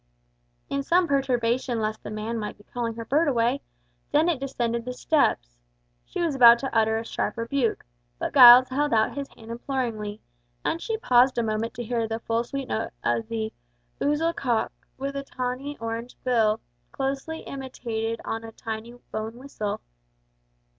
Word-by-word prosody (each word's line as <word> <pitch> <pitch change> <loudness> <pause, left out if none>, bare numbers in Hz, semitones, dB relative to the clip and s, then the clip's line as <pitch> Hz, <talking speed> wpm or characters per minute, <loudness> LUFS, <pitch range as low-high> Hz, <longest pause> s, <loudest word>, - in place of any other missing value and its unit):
In 280 0 -1
some 345 +5 +3
perturbation 250 -3 +1
lest 215 0 -2
the - - -7
man 215 +2 -3
might 210 -1 -5
be 205 - -18
calling 230 0 -4
her 230 0 -6
bird 300 +7 +2
away, 245 0 +2 0.5
Dennet 315 0 +3
descended 235 -3 -2
the 250 +1 -4
steps. - - +1 0.5
She - - -3
was 330 -3 +1
about 240 -3 +8
to 265 0 -5
utter 220 0 +3
a 225 - -4
sharp - - -2
rebuke, 230 0 -1 0.3
but - - -3
Giles 250 -1 +10
held 285 -1 +1
out 220 0 +2
his 280 -1 -4
hand 225 0 -11
imploringly, 230 -4 -3 0.5
and 330 - 0
she 445 -1 -2
paused 250 - +4
a 235 - +2
moment 220 +1 -2
to 240 - -4
hear 230 -1 -1
the 225 0 -2
sweet 235 +4 -2
full - - 0
note - - -5
of 225 - 0
the 220 -1 -3 0.5
"ouzel 300 +4 +2
cock, 240 -8 0 0.3
with 275 +1 -4 0.2
orange 255 +3 -3
tawny 230 +2 -5
bill" 225 -4 +2 0.3
closely 275 - -3
imitated 230 -4 -4
on 225 0 -3
a 225 - -8
tiny 225 +1 -6 0.2
bone 220 +1 -4
whistle. 245 -6 -4
240 Hz, 165 wpm, -26 LUFS, 225-275 Hz, 0.5 s, Giles